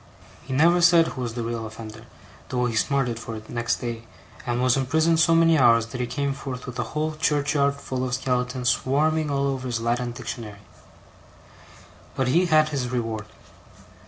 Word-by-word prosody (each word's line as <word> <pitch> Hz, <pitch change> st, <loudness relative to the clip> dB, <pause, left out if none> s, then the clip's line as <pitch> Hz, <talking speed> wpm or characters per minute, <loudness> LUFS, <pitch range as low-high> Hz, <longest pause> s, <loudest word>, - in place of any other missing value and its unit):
He -, -, -7 dB
never 170 Hz, +6 st, +4 dB
said 170 Hz, -1 st, +5 dB
who 130 Hz, -, -6 dB
was 120 Hz, -2 st, -4 dB
the 120 Hz, -, -3 dB
real 115 Hz, -1 st, -4 dB
offender, 110 Hz, +1 st, -10 dB, 0.4 s
though 125 Hz, -1 st, 0 dB
he 120 Hz, -2 st, -2 dB
smarted 125 Hz, -1 st, 0 dB
for 115 Hz, -1 st, -7 dB
it 110 Hz, 0 st, -10 dB
next 120 Hz, -1 st, 0 dB
day, 115 Hz, -2 st, -6 dB, 0.4 s
and 120 Hz, 0 st, 0 dB
was 125 Hz, 0 st, +3 dB
imprisoned 160 Hz, +5 st, +2 dB
so 165 Hz, 0 st, +4 dB
many 165 Hz, -1 st, +4 dB
hours 115 Hz, -3 st, +5 dB
that 125 Hz, +2 st, -6 dB
he 125 Hz, -, -1 dB
came 140 Hz, +1 st, -2 dB
forth 130 Hz, -2 st, -7 dB
with 125 Hz, 0 st, -7 dB
a 120 Hz, +5 st, -4 dB
whole 155 Hz, +1 st, 0 dB
churchyard 145 Hz, -2 st, +1 dB
full 130 Hz, -2 st, -4 dB
of 125 Hz, -1 st, -1 dB
skeletons 125 Hz, -1 st, -1 dB
swarming 150 Hz, +6 st, +1 dB
all 140 Hz, -1 st, 0 dB
over 135 Hz, -2 st, -2 dB
his 120 Hz, -2 st, -2 dB
Latin 120 Hz, +2 st, -1 dB
Dictionary. 115 Hz, -4 st, -7 dB, 1.6 s
But 130 Hz, -1 st, 0 dB
he 175 Hz, +6 st, +3 dB
had 155 Hz, -1 st, +4 dB
his 135 Hz, -4 st, -2 dB
reward. 115 Hz, -3 st, -3 dB
125 Hz, 185 wpm, -24 LUFS, 120-145 Hz, 1.6 s, said